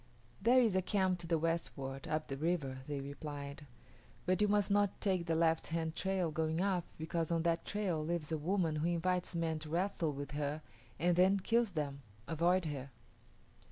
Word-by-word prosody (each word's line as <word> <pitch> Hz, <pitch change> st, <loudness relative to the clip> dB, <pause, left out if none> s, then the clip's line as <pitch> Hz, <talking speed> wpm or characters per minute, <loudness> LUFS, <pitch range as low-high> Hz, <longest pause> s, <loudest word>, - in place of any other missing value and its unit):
"There 240 Hz, +5 st, +6 dB
is 225 Hz, -6 st, +3 dB
a 190 Hz, -, +4 dB
camp 185 Hz, -1 st, +1 dB
to 170 Hz, -, -5 dB
the 165 Hz, 0 st, +2 dB
westward, 150 Hz, -5 st, -2 dB
up 155 Hz, 0 st, -1 dB
the 135 Hz, -, -3 dB
river," 145 Hz, -3 st, -1 dB
they 145 Hz, -2 st, -2 dB
replied; 140 Hz, 0 st, -7 dB, 0.6 s
"but 185 Hz, +3 st, +2 dB
you 210 Hz, -, +5 dB
must 205 Hz, -1 st, +2 dB
not 205 Hz, -1 st, +2 dB
take 185 Hz, -4 st, 0 dB
the 165 Hz, -, +2 dB
left 165 Hz, 0 st, +2 dB
hand 160 Hz, 0 st, -2 dB
trail 190 Hz, -3 st, 0 dB
going 160 Hz, +1 st, 0 dB
up 185 Hz, -2 st, +1 dB
because 160 Hz, 0 st, -2 dB
on 165 Hz, -1 st, +1 dB
that 170 Hz, 0 st, +1 dB
trail 190 Hz, -7 st, -1 dB
lives 165 Hz, -1 st, -2 dB
a 160 Hz, -, +1 dB
woman 165 Hz, -1 st, +1 dB
who 155 Hz, +2 st, +1 dB
invites 175 Hz, +1 st, 0 dB
men 165 Hz, -1 st, 0 dB
to 155 Hz, 0 st, -8 dB
wrestle 170 Hz, -1 st, 0 dB
with 145 Hz, +1 st, -6 dB
her 150 Hz, +1 st, -2 dB, 0.3 s
and 175 Hz, +3 st, +2 dB
then 190 Hz, +2 st, +5 dB
kills 230 Hz, +1 st, +2 dB
them. 140 Hz, -3 st, -3 dB, 0.3 s
Avoid 175 Hz, +3 st, +2 dB
her." 140 Hz, -3 st, -4 dB
165 Hz, 190 wpm, -35 LUFS, 155-185 Hz, 0.6 s, There